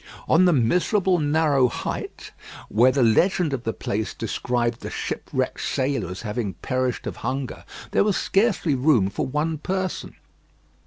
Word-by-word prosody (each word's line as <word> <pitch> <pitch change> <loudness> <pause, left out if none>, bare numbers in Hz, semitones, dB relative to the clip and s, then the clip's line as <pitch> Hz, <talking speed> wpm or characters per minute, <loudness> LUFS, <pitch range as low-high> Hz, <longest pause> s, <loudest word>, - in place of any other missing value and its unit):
On 175 +3 +5
the 180 - +5
miserable 180 - +2
narrow 145 -3 +3
height 120 - -5 0.4
where 120 +4 +4
the 130 -1 +2
legend 160 - +3
of 130 -2 -4
the 115 - 0
place 110 0 -3
described 120 +1 -1
the - - -6
shipwrecked - - -3
sailor 130 -7 -1
as 95 +5 -7
having 105 -3 -3
perished 130 +5 -2
of - - -5
hunger, 130 +2 -4 0.3
there - - +3
was 205 -2 +1
scarcely 195 -6 +1
room 125 -8 +3
for - - -2
one 150 +3 -1
person. 185 +2 -3
135 Hz, 150 wpm, -24 LUFS, 120-165 Hz, 0.4 s, On